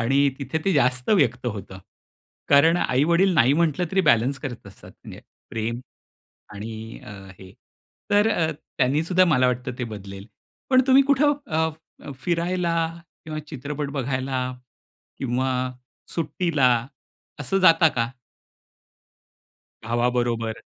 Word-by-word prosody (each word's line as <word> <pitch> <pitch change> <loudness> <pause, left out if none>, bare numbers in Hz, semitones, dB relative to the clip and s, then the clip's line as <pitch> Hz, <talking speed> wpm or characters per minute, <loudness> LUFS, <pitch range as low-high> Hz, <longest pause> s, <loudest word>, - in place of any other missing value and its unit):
आणि 135 +4 +3
तिथे 150 +3 -3
ते 195 - +2
जास्त 125 - +2
व्यक्त 130 - +2
होतं. 95 -4 -6 0.7
कारण 160 +4 +5
आई-वडील 170 +8 +2
नाही 135 -3 +4
म्हटलं 165 +1 +1
तरी 190 - +3
बॅलन्स 125 +4 +3
करत 120 -6 -7
असतात, 95 - -14
म्हणजे - - -10 0.3
प्रेम 115 +2 -3 0.7
आणि 110 +2 -7
अ, 115 - -10 0.3
हे 95 0 -13 0.6
तर 205 +2 +4
अ, 160 -6 +1 0.3
त्यांनी 140 +4 +2
सुद्धा 185 +1 +3
मला 135 -7 +3
वाटत 125 0 -1
ते 125 - -2
बदलेल. 100 0 -9 0.4
पण 260 0 +6
तुम्ही 270 +1 +6
कुठं 290 +2 +4
अ, 160 0 0 0.4
अ, 140 - -7
फिरायला 175 0 0 0.5
किंवा 155 -1 -5
चित्रपट 145 0 -5
बघायला 130 -1 -2 0.8
किंवा 130 0 -1 0.7
सुट्टीला 160 -4 +1 0.7
असं 145 +8 0
जाता 165 -2 +6
का? 120 -5 -2 1.7
भावाबरोबर. 120 -1 -1
140 Hz, 120 wpm, -23 LUFS, 120-165 Hz, 1.7 s, पण